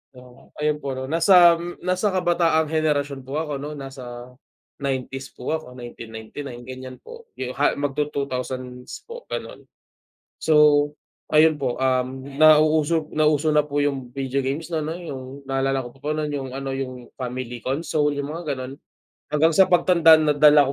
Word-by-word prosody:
Oo. 125 Hz, +1 st, -16 dB
Ayun 150 Hz, 0 st, +1 dB
po 140 Hz, -, -2 dB
'no, 130 Hz, 0 st, -4 dB
nasa 170 Hz, +2 st, +6 dB, 0.2 s
nasa 185 Hz, +3 st, 0 dB
kabataang 175 Hz, -3 st, +2 dB
henerasyon 145 Hz, -3 st, -1 dB
po 135 Hz, +4 st, -3 dB
ako, 150 Hz, -2 st, -3 dB
no, 150 Hz, -, -5 dB
nasa 125 Hz, -2 st, -9 dB, 0.5 s
'90s 135 Hz, 0 st, -3 dB
po 130 Hz, +5 st, -3 dB
ako, 155 Hz, -5 st, -7 dB
1999, 120 Hz, +1 st, -9 dB
ganyan 130 Hz, 0 st, -8 dB
po, 470 Hz, -1 st, -13 dB, 0.2 s
ha 145 Hz, -, +3 dB
mag 140 Hz, -1 st, -2 dB
tu 150 Hz, -, +2 dB
'2000s 130 Hz, -, -5 dB
po, 475 Hz, +1 st, -9 dB
ganon. -, -, -6 dB, 0.7 s
So, 160 Hz, -, +1 dB, 0.8 s
ayun 155 Hz, 0 st, +5 dB
po, 130 Hz, -3 st, -2 dB
um, 130 Hz, +1 st, -1 dB
nauuso 155 Hz, 0 st, +4 dB
nauso 155 Hz, 0 st, +2 dB
na 150 Hz, -1 st, +3 dB
po 145 Hz, 0 st, -1 dB
yung 135 Hz, -4 st, -2 dB
video 135 Hz, 0 st, -2 dB
games 150 Hz, +5 st, -3 dB
na 160 Hz, -2 st, -2 dB
'no 160 Hz, -, -3 dB
yung, 160 Hz, -7 st, -7 dB, 0.3 s
naalala 135 Hz, 0 st, 0 dB
ko 120 Hz, -, -8 dB
pa -, -, -24 dB
po -, -, -1 dB
nun, 155 Hz, -1 st, -2 dB
yung 135 Hz, -3 st, -4 dB
ano, 135 Hz, 0 st, -4 dB
yung 130 Hz, -2 st, -6 dB
family 125 Hz, -1 st, -5 dB
console, 150 Hz, +1 st, 0 dB
yung 140 Hz, 0 st, -4 dB
mga 155 Hz, -1 st, -3 dB
ganon, 130 Hz, +1 st, -7 dB, 0.5 s
hanggang 155 Hz, +2 st, +3 dB
sa 190 Hz, +3 st, +5 dB
pag 175 Hz, -2 st, +3 dB
tanda 165 Hz, -3 st, +7 dB
nadala 150 Hz, -1 st, +5 dB
145 Hz, 160 wpm, -23 LUFS, 130-155 Hz, 0.8 s, tanda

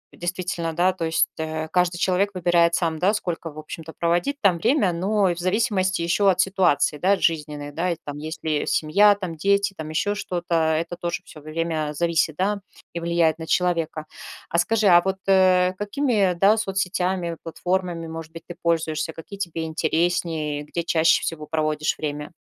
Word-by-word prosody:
действительно, 175 Hz, -2 st, -3 dB
да, 180 Hz, +3 st, +2 dB
то 170 Hz, -3 st, -3 dB
есть, 160 Hz, 0 st, +2 dB
э, 160 Hz, 0 st, -3 dB
каждый 180 Hz, -1 st, +1 dB
человек 190 Hz, +3 st, +1 dB
выбирает 170 Hz, -1 st, +3 dB
сам, 160 Hz, -3 st, -1 dB
да, 200 Hz, +4 st, +2 dB
сколько, 170 Hz, -5 st, -4 dB
в 150 Hz, -, -16 dB
общем-то, 160 Hz, +1 st, -8 dB
проводить 175 Hz, +12 st, 0 dB
там 180 Hz, -5 st, +3 dB
время, 205 Hz, -, +2 dB
но 195 Hz, +2 st, +1 dB
и -, -, 0 dB
в 175 Hz, -, -8 dB
зависимости 185 Hz, -1 st, 0 dB
еще 195 Hz, +4 st, +3 dB
от 185 Hz, -1 st, +1 dB
ситуации, 180 Hz, -6 st, +2 dB
да, 195 Hz, +2 st, +3 dB
жизненной, 150 Hz, -3 st, -1 dB
да, 170 Hz, +5 st, -1 dB
и -, -, -1 dB
там 145 Hz, 0 st, -6 dB
есть 155 Hz, +2 st, -7 dB
ли 155 Hz, -2 st, -1 dB
семья, 200 Hz, +7 st, +4 dB
там, 185 Hz, -5 st, -5 dB
дети, 200 Hz, +4 st, +1 dB
там 155 Hz, -2 st, -7 dB
еще 185 Hz, +6 st, 0 dB
что-то, 175 Hz, -4 st, -4 dB
это 160 Hz, +2 st, 0 dB
тоже 170 Hz, 0 st, -3 dB
всё 155 Hz, -, -13 dB
время 155 Hz, 0 st, -2 dB
зависит, 165 Hz, -1 st, +1 dB
да, 200 Hz, +3 st, -1 dB, 0.3 s
и 170 Hz, -, -3 dB
влияет 170 Hz, -1 st, +1 dB
на 160 Hz, -, -7 dB
человека. 165 Hz, -3 st, 0 dB, 0.4 s
А 170 Hz, -, +1 dB
скажи, 225 Hz, +1 st, +1 dB
а 175 Hz, -1 st, +7 dB
вот, 190 Hz, +1 st, -2 dB
э, 185 Hz, -1 st, +4 dB
какими, 245 Hz, +6 st, -1 dB
э, 195 Hz, -4 st, +3 dB
да, 200 Hz, +5 st, +4 dB
соцсетями, 185 Hz, -3 st, -1 dB
платформами, 175 Hz, 0 st, -2 dB
может 160 Hz, 0 st, -7 dB
быть, 165 Hz, 0 st, -9 dB
ты 175 Hz, -, -8 dB
пользуешься, 160 Hz, -1 st, 0 dB
какие 195 Hz, +5 st, -10 dB
тебе 170 Hz, -4 st, -3 dB
интереснее, 160 Hz, -2 st, -1 dB
где 170 Hz, +3 st, -4 dB
чаще 160 Hz, -1 st, +3 dB
всего 155 Hz, -2 st, -4 dB
проводишь 155 Hz, -1 st, -1 dB
время? 150 Hz, +1 st, -5 dB
170 Hz, 180 wpm, -23 LUFS, 160-185 Hz, 0.4 s, а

